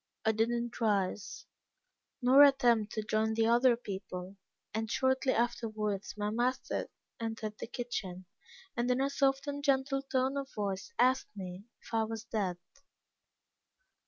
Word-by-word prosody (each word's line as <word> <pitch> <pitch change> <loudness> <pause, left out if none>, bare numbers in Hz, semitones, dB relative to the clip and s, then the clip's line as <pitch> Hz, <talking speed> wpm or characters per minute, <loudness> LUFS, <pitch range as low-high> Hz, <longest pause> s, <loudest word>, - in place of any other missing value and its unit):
I 220 - +5
did 220 +1 +1
not 240 0 -3
rise, 205 -2 0 0.8
nor 260 +3 +7
attempt 245 -6 +5
to 215 - -2
join 220 +1 0
the 225 0 +3
other 240 +2 +5
people, 190 -3 -6 0.4
and 220 0 -2
shortly 260 +2 +2
afterwards 220 -4 -1
my 210 0 -1
master 245 +4 -1 0.3
entered 225 -2 -4
the - - -5
kitchen, 200 -7 -5 0.5
and 240 +1 0
in 250 +1 +2
a 275 +1 +1
soft 275 -1 +2
and 285 0 -4
gentle 275 -1 +2
tone 265 0 0
of 275 0 -4
voice, 195 -2 -3
asked 255 +2 +3
me 185 +1 -7 0.2
if - - -14
I 225 -1 +2
was 225 0 -5
dead. 205 -6 -2
230 Hz, 145 wpm, -32 LUFS, 210-260 Hz, 0.8 s, nor